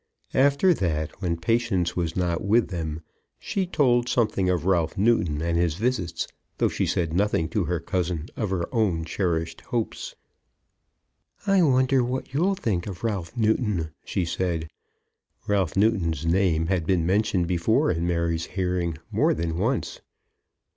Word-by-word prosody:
After 140 +7 +4
that, 80 - -2
when 85 -3 -1
Patience 90 -2 0
was 85 -2 -2
not 90 -2 0
with 110 +4 +3
them, 80 -3 -4 0.3
she 190 -2 -2
told 125 -7 +2
something 105 -6 +1
of 90 -2 0
Ralph 85 -4 +1
Newton 90 -8 +2
and 85 0 0
his 85 -3 +1
visits, 95 -6 -1 0.3
though - - +2
she - - -1
said 85 -3 0
nothing 95 -3 +1
to 105 -6 0
her 90 0 -1
cousin 85 -2 -2
of 105 -4 -2
her 90 -3 -1
own 95 -9 +1
cherished 80 -2 -2
hopes. 115 -2 -3 1.3
"I 195 -2 +4
wonder 130 -3 +3
what 130 +1 -4
you'll 180 +7 +2
think 100 - -2
of 95 0 -7
Ralph 105 -1 -3
Newton?" 105 -7 +1
she 90 - -1
said. 85 -2 -2 0.7
Ralph 95 -4 0
Newton's 90 -8 +1
name 85 -2 +2
had 85 -2 -1
been 90 -4 +2
mentioned 95 -1 +2
before 90 - +2
in 85 +1 -1
Mary's 85 -1 0
hearing 90 -3 -1
more - - +2
than 80 0 -2
once. 115 +8 -1
90 Hz, 150 wpm, -25 LUFS, 85-115 Hz, 1.3 s, After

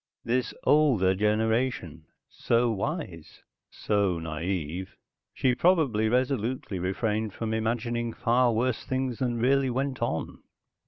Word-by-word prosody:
This 125 +2 0
older 130 -12 +4
generation 105 - 0 0.2
so 120 0 +1
wise, 100 - -5 0.3
so 100 -4 0
naive. 80 +2 -4 0.4
She 130 - +1
probably 130 - +2
resolutely 125 -4 -1
refrained 105 +3 -1
from 110 -1 -3
imagining 115 +1 -1
far 120 +2 +2
worse 120 +1 0
things 130 -2 -2
than 120 -3 -1
really 135 +3 +2
went 130 +1 -2
on. 115 -9 -3
115 Hz, 110 wpm, -27 LUFS, 100-130 Hz, 0.4 s, older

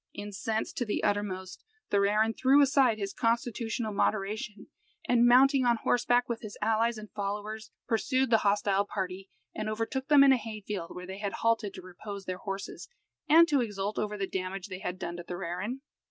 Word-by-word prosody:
Incensed 205 +2 -3
to - - +1
the 210 - -2
uttermost, 190 -2 -2 0.3
Thorarin 210 +2 +3
threw 265 +4 +4
aside 265 -5 +3
his 200 -2 -4
constitutional 230 -1 -1
moderation, 210 0 -1 0.4
and, 240 0 +4
mounting 265 +2 +6
on 240 -1 +3
horseback, 245 +1 +2
with 235 -2 -3
his 215 -2 -8
allies 225 +2 +1
and 215 -1 -10
followers, 210 +2 -4 0.2
pursued 255 +2 +1
the 225 - +6
hostile 200 -1 +2
party, 190 -1 -5 0.2
and 215 0 -3
overtook 230 +5 -3
them 290 -2 +7
in 275 - +7
a 265 - +5
hay 220 -1 -7
field, 195 -4 -5
where 180 - -7
they 190 +2 -8
had 200 -1 -3
halted 230 -3 0
to - - -9
repose 195 +2 -8
their 185 0 -4
horses, 195 - -6 0.4
and 330 +2 +8
to 285 -4 +2
exult 205 -2 -3
over 210 0 -2
the 195 - -1
damage 190 +1 -4
they 185 -1 -6
had 180 -1 -4
done 170 -1 -5
to 175 - -7
Thorarin. 180 +9 -4
215 Hz, 185 wpm, -29 LUFS, 195-235 Hz, 0.4 s, and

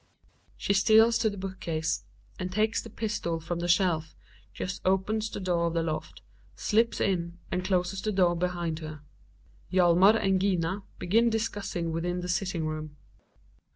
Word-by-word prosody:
She 200 - 0
steals 220 +3 +5
to 220 - +2
the 205 - -7
book 190 0 -6
case, 160 -1 -2 0.3
and 185 0 -3
takes 215 +3 +1
the 230 - -10
pistol 205 -7 -2
from 170 +1 -4
the 175 - -2
shelf, 170 -3 +2 0.4
just 185 - -5
opens 205 +4 +1
the - - -6
door 175 -3 +1
of 170 - -3
the 165 - +1
loft, 155 -1 -4 0.3
slips 230 +2 +1
in 170 -3 -1
and 180 0 -1
closes 185 0 0
the 215 - -1
door 180 -3 +3
behind 170 -2 -2
her. 155 -2 -8 0.7
Hjalmar 185 +3 +6
and 190 -3 +1
Gina 190 0 0 0.2
begin 225 +6 +3
discussing 205 -6 -2
within 175 +2 -2
the 180 - -5
sitting 180 -3 -1
room. 155 -1 -5
180 Hz, 160 wpm, -28 LUFS, 170-200 Hz, 0.7 s, Hjalmar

